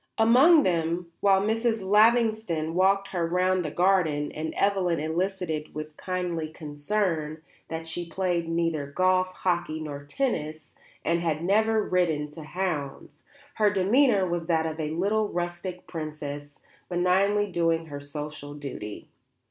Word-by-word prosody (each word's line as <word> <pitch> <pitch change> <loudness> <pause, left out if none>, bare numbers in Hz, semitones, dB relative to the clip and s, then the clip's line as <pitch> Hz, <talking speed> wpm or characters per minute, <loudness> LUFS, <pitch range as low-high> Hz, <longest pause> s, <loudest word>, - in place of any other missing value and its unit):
Among 265 +8 +6
them, 170 0 -1
while 195 -1 +4
Mrs. 225 -1 0
Lavington 215 -6 +3
walked 195 +2 +2
her 175 -3 -1
round 180 +1 +1
the 155 - -3
garden 170 -4 +2
and 160 +1 -4
Evelyn 190 -4 +1
elicited 160 -1 -2
with 155 0 -6
kindly 180 -3 -3
concern 155 +1 -2 0.2
that 165 0 -5
she 170 +1 -5
played 175 -2 -1
neither 165 -3 0
golf, 185 +4 +2
hockey 175 -4 -2
nor 145 -2 -6
tennis, 155 - -3 0.3
and 170 +1 +2
had 165 -2 -1
never 220 +3 +2
ridden 160 -5 0
to 160 - -10
hounds, 155 -4 -4 0.4
her 210 -1 +4
demeanour 205 +1 +3
was 170 -1 -3
that 160 -2 +2
of 160 0 -4
a 155 -1 -2
little 200 +7 +1
rustic 175 +1 -4
princess 145 -3 -6 0.3
benignly 190 +3 +2
doing 165 -1 +1
her 145 -2 -7
social 145 0 -7
duty. 135 -8 -7
175 Hz, 135 wpm, -27 LUFS, 155-195 Hz, 0.4 s, Among